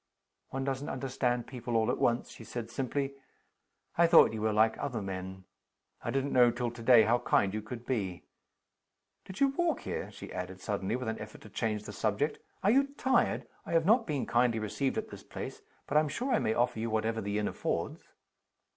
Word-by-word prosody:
"One 135 0 -3
doesn't 135 +1 -2
understand 125 -2 -1
people 120 -2 -5
all 110 -1 +2
at - - -2
once," 120 0 +1
she - - -11
said, 115 0 -6
simply. 135 +2 -2 0.9
"I 170 - +7
thought 165 -8 +7
you 110 - -4
were 110 0 +2
like 110 +1 +4
other 125 -5 -2
men 95 -1 -5 0.6
I - - -2
didn't 135 +3 0
know 125 -1 +7
till 120 0 -2
to 120 0 -10
day 115 -1 +7
how 115 +3 +3
kind 100 -4 +2
you 110 - -2
could 115 +2 -8
be. 100 -9 -2 1.0
Did 190 - -9
you 275 - +6
walk 325 +1 0
here?" - - -4
she - - -10
added, 90 0 -5
suddenly, 100 +2 -2
with 125 -2 -4
an 110 - -2
effort 105 0 -9
to 105 - -12
change 105 0 -2
the 105 - -8
subject. 110 +9 0 0.2
"Are 200 - +5
you 275 +3 +4
tired? 260 0 +2 0.2
I - - -5
have 165 -1 +3
not 225 +4 +4
been 145 -5 -1
kindly 120 -1 +2
received 120 +6 -1
at - - -3
this - - -9
place - - -7 0.2
but 150 - +1
I'm 150 -1 +3
sure 250 - -1
I 230 - +4
may 110 - 0
offer 120 -2 +1
you 115 +1 -1
whatever 110 +1 0
the 100 +1 -2
inn 105 -1 0
affords." - - -2
120 Hz, 210 wpm, -31 LUFS, 110-135 Hz, 1.0 s, I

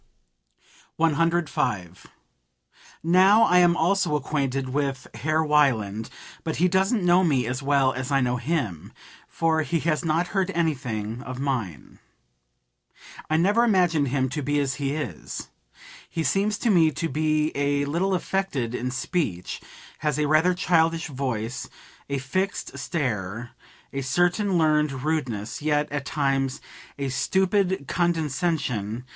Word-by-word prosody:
105. 160 - 0 1.0
"Now 190 +6 +6
I 180 -5 +5
am 175 -1 +4
also 175 -2 +2
acquainted 135 -2 -1
with 135 -1 -2
Herr 155 +8 0
Wieland; 115 -8 +2 0.3
but 160 - -2
he 180 - +3
doesn't 190 +2 +1
know 180 +1 +5
me 135 -8 +2
as 125 +4 -3
well 135 -1 +2
as 130 0 -4
I 135 - +3
know 125 -1 +1
him, 120 - -3 0.3
for 160 -1 +1
he 160 +3 -1
has 155 0 0
not 165 +2 0
heard 195 -2 0
anything 125 -9 -2
of 130 0 -7
mine. 120 - -4 1.3
I 155 - +2
never 205 +8 +3
imagined 175 -9 +3
him 130 0 0
to 150 +4 -3
be 145 +1 0
as 140 -2 0
he 140 0 0
is. 125 - -6 0.6
He 165 - -2
seems 200 +8 +1
to 235 - +1
me 165 -4 +5
to 165 +2 -3
be 155 0 +1
a 140 0 +1
little 180 +6 0
affected 175 -11 -2
in 125 0 -2
speech, 125 - -3 0.4
has 150 -2 0
a 150 - +1
rather 160 +4 +3
childish 165 -2 +1
voice, 125 -4 -3 0.4
a 140 - -1
fixed 185 +10 -2
stare, 115 - -3 0.4
a 135 - -2
certain 175 +8 +1
learned 150 -4 +2
rudeness, 130 -10 -2
yet, 150 -1 0
at 145 -1 -3
times, 135 -2 0 0.4
a 140 -1 -2
stupid 190 +4 +1
condescension. 150 - -1
150 Hz, 135 wpm, -25 LUFS, 130-170 Hz, 1.3 s, Now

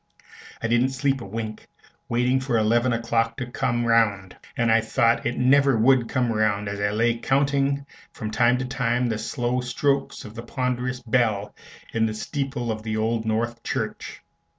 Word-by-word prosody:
I - - +1
didn't 120 +3 +3
sleep 135 0 0
a 100 - -7
wink, 110 +1 -6 0.4
waiting 125 +2 +2
for 130 -3 0
eleven 120 +3 +2
o'clock 115 0 0
to 125 - -3
come 120 -1 -1
round; 105 -5 +2 0.2
and 115 -2 +2
I 115 0 +5
thought 115 +1 +1
it 120 - -2
never 135 0 +4
would 120 +1 +3
come 125 -2 0
round, 105 -1 +1
as 100 0 -4
I 105 0 +1
lay 115 +2 +1
counting 140 +1 +1 0.3
from 110 -1 -6
time 120 +2 +3
to 130 - -3
time 125 -1 0
the 110 -1 -2
slow 125 +1 -1
strokes 135 +3 -1
of 105 - -10
the 115 - -7
ponderous 125 0 -2
bell 110 -4 0 0.4
in 115 -1 +2
the 110 - -4
steeple 135 0 -3
of 110 0 -4
the 110 0 -3
Old 110 +1 -1
North 115 +2 -1
Church. - - -4
120 Hz, 175 wpm, -24 LUFS, 110-125 Hz, 0.4 s, I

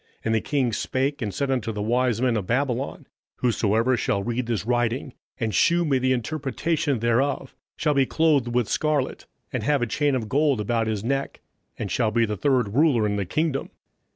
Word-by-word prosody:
And 115 - +1
the 110 - +2
king 135 -6 0
spake, 135 +5 -1
and 105 -3 -2
said 135 +5 0
to 110 +1 -3
the 105 - -5
wise 120 +2 +1
men 125 -3 +2
of 100 -4 -2
Babylon, 130 +1 -1 0.3
Whosoever 115 +1 +1
shall 100 -3 -1
read 120 +1 -2
this 110 -5 -1
writing, 120 +2 0 0.3
and 110 -2 -1
shew 170 0 +3
me 135 -4 +2
the 130 +1 +1
interpretation 145 +3 -1
thereof, 120 +4 0 0.2
shall 150 -1 +1
be 135 -2 +2
clothed 155 -6 +2
with 120 -2 0
scarlet, 150 -4 -1 0.3
and - - -1
have 145 -3 +1
a - - +2
chain 145 +4 +1
of 115 -4 -2
gold 140 0 +2
about 115 +2 0
his 105 -2 -2
neck, 135 +3 -2 0.4
and 100 - -4
shall 115 +1 +1
be 115 +2 +2
the 105 -1 -3
third 125 -4 +1
ruler 135 -5 +3
in 105 -1 0
the 100 - -1
kingdom. 150 - -1
125 Hz, 195 wpm, -24 LUFS, 115-140 Hz, 0.4 s, shew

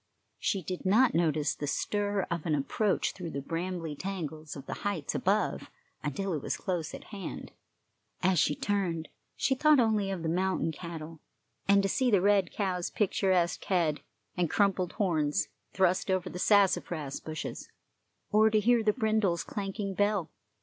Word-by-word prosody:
She 195 -3 0
did 180 +2 -5
not 225 +6 +4
notice 155 -3 +2
the 145 - -5
stir 205 +5 0
of 170 -1 -2
an 155 - +2
approach 190 +8 0
through 175 -3 -7
the 140 - -4
brambly 165 +1 -3
tangles 155 -4 -5
of 140 -1 -9
the - - -4
heights 200 -8 -2
above 200 +1 0 0.3
until 180 +6 -2
it 150 - -2
was - - -2
close 175 -4 -3
at - - -10
hand; 195 -2 -6 0.7
as 180 -2 +4
she 150 - +3
turned, 180 -5 -1 0.3
she 270 - +1
thought 300 +2 +5
only 215 -4 +2
of 190 -4 -3
the - - -1
mountain 185 0 0
cattle 165 -1 -8 0.5
and 200 0 +5
to - - +2
see 255 +6 +1
the 205 -4 +5
red 195 -1 +3
cow's 185 -4 -1
picturesque 185 -4 +1
head 165 -6 +1 0.3
and 175 -3 +1
crumpled 195 -3 +1
horns 160 -5 +1 0.2
thrust 185 0 +2
over 185 -1 0
the 180 - -6
sassafras 175 -8 +2
bushes, 155 0 -6 0.6
or 215 +1 +5
to 215 0 +3
hear 235 +2 +4
the 215 -1 +2
brindle's 215 - +1
clanking 195 +2 -4
bell. 205 -2 +1
185 Hz, 165 wpm, -30 LUFS, 165-205 Hz, 0.7 s, thought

